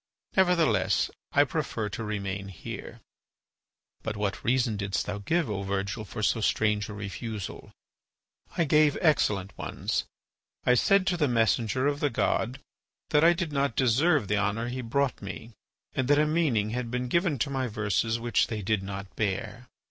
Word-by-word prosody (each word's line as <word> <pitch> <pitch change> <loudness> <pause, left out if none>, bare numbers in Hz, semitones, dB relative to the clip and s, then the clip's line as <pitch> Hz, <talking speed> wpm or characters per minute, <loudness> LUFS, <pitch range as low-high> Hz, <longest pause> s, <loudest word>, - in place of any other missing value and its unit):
Nevertheless 180 -4 +3 0.2
I - - +5
prefer 110 - -2
to 110 - -5
remain 100 -2 -3
here." 95 - -8 1.0
"But 105 - -4
what 100 -1 -2
reason 120 -2 +2
didst 100 -1 -2
thou 105 0 -4
give, 165 - 0
O 105 -3 -3
Virgil, 100 +3 -2
for 110 +1 -6
so 115 - +2
strange 105 0 +1
a - - -6
refusal?" 105 0 -6 0.9
"I 170 - +4
gave 150 -1 +4
excellent 105 - +2
ones. - - -2 0.6
I 125 - +5
said 190 - +4
to 185 -2 +1
the 150 -3 +2
messenger 115 +1 +1
of 145 0 +1
the 145 - +1
god 120 +1 0 0.5
that 150 - +4
I 170 +1 +7
did 170 -2 -3
not 140 -4 0
deserve 135 - +3
the 105 +2 +1
honour 105 +4 -1
he 130 +1 -4
brought 130 +3 0
me, 100 +3 -7 0.4
and 130 - -1
that 145 +1 +5
a 150 - +4
meaning 145 -10 +1
had 120 0 -3
been 125 +1 -2
given 170 +2 +1
to 130 +4 -1
my 130 -2 -1
verses 110 +1 0
which 120 0 +2
they 110 -3 -4
did 110 0 +1
not 95 0 -7
bear. 110 +3 -3
115 Hz, 170 wpm, -28 LUFS, 105-140 Hz, 1.0 s, I